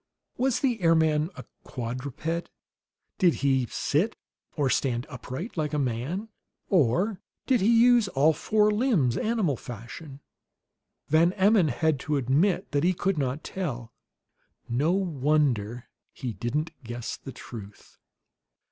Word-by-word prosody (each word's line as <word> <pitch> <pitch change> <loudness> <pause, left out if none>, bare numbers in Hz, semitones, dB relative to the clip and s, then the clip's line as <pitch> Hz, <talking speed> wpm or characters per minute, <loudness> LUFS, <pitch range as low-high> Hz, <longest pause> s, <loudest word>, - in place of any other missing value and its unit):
Was 255 -1 +1
the 245 -7 0
airman 160 -2 +3
a - - -8 0.2
quadruped? 130 +7 -4 0.7
Did 180 -5 +4
he 130 -3 +2
sit 175 - 0 0.4
or 145 -2 +2
stand 125 -2 0
upright, 130 - -6
like 155 -1 -1
a - - +1
man? 140 - -2 0.4
Or 180 - +2 0.2
did 255 -5 +2
he 230 +4 +5
use 240 -3 +5
all 155 -1 +3
four 210 +6 +2
limbs, 210 - +2
animal 215 - 0
fashion? 125 +6 -9 0.9
Van 165 +4 +4
Emmon 200 -2 +4
had 150 +2 +1
to 150 +2 -1
admit 155 - +1
that 145 -1 +1
he 180 +2 +3
could 190 -2 0
not 135 +2 -2
tell; 125 -11 -5 0.7
no 140 +8 +1
wonder 145 - 0 0.2
he 125 -3 -5
didn't 150 +9 -2
guess 120 0 -5
the 135 - -9
truth. 110 -5 -11
150 Hz, 130 wpm, -27 LUFS, 125-190 Hz, 0.9 s, he